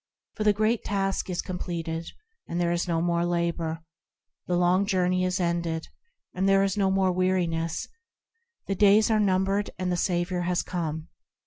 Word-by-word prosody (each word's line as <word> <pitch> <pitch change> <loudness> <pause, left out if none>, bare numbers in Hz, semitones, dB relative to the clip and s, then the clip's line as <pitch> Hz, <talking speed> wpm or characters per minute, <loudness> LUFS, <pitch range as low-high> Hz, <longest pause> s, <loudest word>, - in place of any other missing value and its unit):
For 215 - -3
the 210 - +5
Great 215 +2 +1
Task 195 -2 -1
is 180 - -2
completed, 170 -2 -4 0.4
and 170 - -3
there 170 -1 +1
is 175 +1 -1
no 165 -1 0
more 170 0 +1
labour; 170 -1 -1 0.6
The 175 - +1
Long 180 +2 +3
Journey 185 -2 +1
is 185 +1 0
ended, 170 -2 -1 0.4
and 190 +2 +1
there 195 0 +5
is 195 -1 0
no 195 -2 +2
more 190 -1 +2
weariness; 175 -3 0 0.8
The 195 - -1
days 205 +3 +5
are 215 - +3
numbered, 195 0 +1
and 185 -1 -2
the 175 - 0
Saviour 175 0 0
has 175 0 0
come. 160 -3 -4
180 Hz, 170 wpm, -26 LUFS, 170-195 Hz, 0.8 s, the